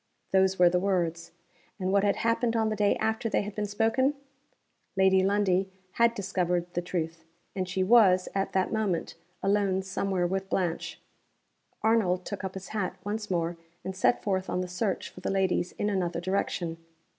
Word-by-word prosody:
Those 190 0 +4
were 180 - +6
the 180 +1 +3
words 175 -3 -1 0.5
and 185 0 -1
what 200 0 +3
had 200 -1 +3
happened 230 0 +1
on 220 -1 +2
the 215 - -1
day 205 -1 +2
after 220 +1 -1
they 210 - +1
had 205 0 -6
been 210 0 -2
spoken? 225 +7 +1 0.8
Lady 190 0 +5
Lundie 195 -1 +2 0.2
had 235 +3 +3
discovered 180 -3 0
the 175 - 0
truth; 165 -2 -4 0.3
and 185 -1 -2
she 185 0 0
was, 190 -4 +5
at 195 0 -1
that 190 +1 +1
moment, 210 -6 -1 0.3
alone 195 -1 +2
somewhere 190 -1 -1
with 190 +2 -2
Blanche. 175 -4 -2 0.8
Arnold 195 -5 +2
took 200 - -5
up 190 0 -4
his 190 0 -7
hat 205 -4 -2
once 210 +1 -4
more, 170 -1 -1 0.3
and 190 - -4
set 195 - +2
forth 190 -2 -1
on 180 - 0
the 180 - -3
search 185 +2 -2
for - - -12
the - - -2
ladies 190 -2 +1
in 205 - -2
another 180 -4 -1
direction. 175 -2 -2
190 Hz, 180 wpm, -28 LUFS, 180-205 Hz, 0.8 s, were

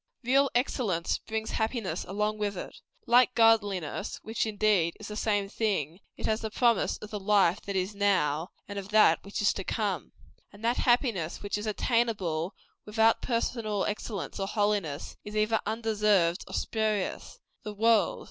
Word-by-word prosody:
Real 270 +3 +3
excellence 220 -9 0
brings 220 0 -3
happiness 220 -2 -2
along 210 +2 -2
with 205 -2 -2
it. - - -7 0.3
Like 250 +1 +4
godliness 205 -6 +2
which, 225 +1 -1
indeed, 205 -5 +1
is 215 - -8
the 210 - -6
same 205 -2 0
thing 195 -7 -2 0.2
it - - -5
has 220 +1 0
the 220 - -3
promise 235 +1 +2
of 210 - -10
the 210 - -3
life 195 -2 +3
that 200 - -3 0.2
now 185 -7 +1
is, - - -29
and 200 0 -5
of 195 0 -9
that 215 0 +5
which 200 +1 -4
is 200 - +4
to 195 - -5
come. 200 -5 -2 0.4
And 210 +2 -9
that 240 +2 +2
happiness 230 - +1
which 200 - -2
is 210 +1 -4
attainable 205 -7 0 0.3
without 225 +1 +2
personal 230 -4 -1
excellence 210 -1 -4
or 195 - -1
holiness, 205 -8 -1
is 210 +1 -8
either 215 +1 +2
undeserved 210 -5 +1
or - - -6
spurious. 215 -3 -2 0.2
The 210 -1 -7
world. 230 - +3
210 Hz, 165 wpm, -29 LUFS, 195-225 Hz, 0.4 s, that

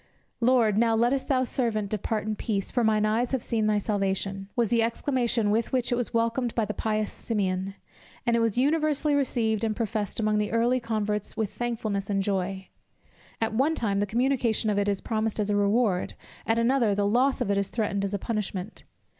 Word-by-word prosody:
"Lord, 230 -4 +3
now 230 -1 +3
lettest 245 +4 +1
thou 260 -2 +2
thy - - +2
servant 230 -5 -1
depart 215 +1 -2
in 215 0 -2
peace, 205 -3 -2
for 245 - +1
mine 215 -1 +3
eyes 230 +4 0
have 260 - 0
seen 220 -2 0
thy 210 -1 +2
salvation," 195 -1 -2
was 235 -4 +1
the 235 -1 +3
exclamation 235 -2 +1
with 225 +2 0
which 255 -2 0
it - - +3
was 245 -1 -2
welcomed 230 +1 0
by 225 - +1
the 210 - -4
pious 215 +1 -1
Simeon; 195 -3 -2 0.5
and 235 - +2
it - - +2
was 230 -1 +1
universally 300 +2 +2
received 230 -6 0
and 220 -1 0
professed 215 -2 -2
among 215 -1 +1
the 210 0 -1
early 235 +3 +2
converts 210 -3 -2
with 215 -3 -2
thankfulness 220 -5 -3
and 195 -1 +1
joy. 190 -1 -2 0.7
At 225 -1 -1
one 275 +8 +2
time, 200 -7 0
the 205 - 0
communication 235 -1 +1
of 205 - +1
it 205 0 +1
is 200 -1 -1
promised 220 -1 -2
as 210 0 0
a - - +2
reward; 205 -1 +1 0.3
at 225 - +2
another, 230 -3 +2
the 200 0 +1
loss 250 +6 +2
of 200 - 0
it 200 - +1
is 200 - -1
threatened 205 -3 -1
as 200 +1 -1
a - - 0
punishment. 210 -2 -4
220 Hz, 205 wpm, -27 LUFS, 205-240 Hz, 0.7 s, Lord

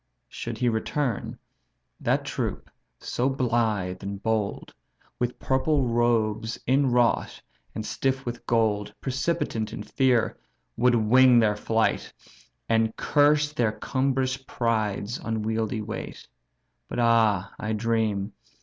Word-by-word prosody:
Should - - -6
he 125 - +1
return, 120 +2 -1 0.6
that - - 0
troop - - -4 0.3
so 125 +3 -1
blithe 115 -8 0
and 100 0 -5
bold, 110 -1 -2 0.5
With 125 0 -1
purple 135 +2 +1
robes 115 -2 +1
inwrought, 130 -2 +2 0.4
and 110 - -4
stiff 135 +2 -1
with 120 -1 -5
gold, 105 -3 +1
Precipitant 130 -5 -2
in 105 - -6
fear 125 +1 +1 0.4
would 120 +1 +3
wing 125 +3 +6
their 110 -3 +4
flight, 110 +1 0 0.6
And 110 0 +2
curse 150 0 +3
their 115 -7 +1
cumbrous 130 +1 0
pride's 115 -4 -2
unwieldy 110 0 -2
weight. 110 - -7 0.6
But - - -6
ah, 110 -5 +3
I 110 +1 -2
dream! 110 -2 0
115 Hz, 115 wpm, -26 LUFS, 110-130 Hz, 0.6 s, wing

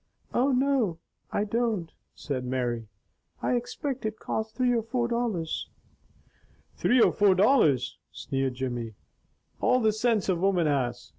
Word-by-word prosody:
"Oh, 265 +3 +3
no 255 -9 +2 0.3
I 205 - 0
don't!" 215 -6 -1 0.2
said 135 -4 -4
Mary. 120 -3 -2 0.6
"I - - +1
expect 245 +2 -3
it 215 0 -3
cost 220 +1 -4
three 250 -1 +2
or 230 - +2
four 235 +2 -1
dollars." 230 -9 -2 1.1
"Three 250 - +3
or - - +6
four 200 -2 +4
dollars," 185 - +3
sneered 135 -1 -2
Jimmy. 120 -4 -4 0.6
"All 255 - +3
the 220 -3 +2
sinse 220 -2 +1
a 185 - +2
woman 180 -1 +2
has! 135 -5 -1
205 Hz, 140 wpm, -27 LUFS, -, 1.1 s, or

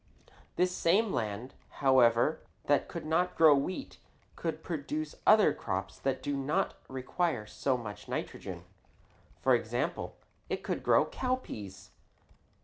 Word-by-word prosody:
This 180 +1 +1
same 200 +5 +2
land, 110 +4 -3 0.2
however, 130 +1 +4 0.2
that 145 0 +2
could 170 - -6
not 170 +3 +1
grow 160 -2 +8
wheat 180 - -2 0.4
could 160 -1 -4
produce 155 -1 -3
other 210 -8 +7
crops 95 -2 -4
that 135 -1 -1
do 145 - -1
not 140 +2 0
require 130 -1 -1
so 130 +4 -1
much 105 -4 -8
nitrogen. - - -5 0.8
For 130 - +5
example, 120 +8 -1 0.3
it - - -3
could - - -2
grow - - +4
cowpeas. 250 - -4
145 Hz, 125 wpm, -31 LUFS, 120-170 Hz, 0.8 s, grow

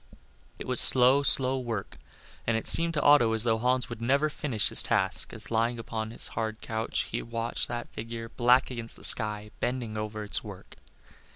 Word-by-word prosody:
It - - -9
was 125 -2 +6
slow, 130 +2 +4
slow 130 -1 +4
work, 115 -5 -7 0.5
and 115 -1 0
it 110 - -6
seemed 165 0 +4
to 150 - -1
Otto 135 -6 +3
as 110 -1 +1
though 115 -2 0
Hans 125 +2 -1
would 120 -1 -10
never 140 +6 0
finish 125 -9 -2
his - - +3
task, 95 +1 +1
as 115 -1 +2
lying 115 +1 -1
upon 110 -1 -6
his 115 - -1
hard 110 -1 -5
couch 110 -1 -4
he - - -4
watched 115 0 -4
that 120 0 -7
figure, 115 0 -9
black 125 +3 +1
against 115 -2 +3
the - - -17
sky, 105 -2 +3
bending 120 -3 -5
over 105 0 -7
its 105 - -1
work. - - -13
115 Hz, 190 wpm, -26 LUFS, 110-125 Hz, 0.5 s, was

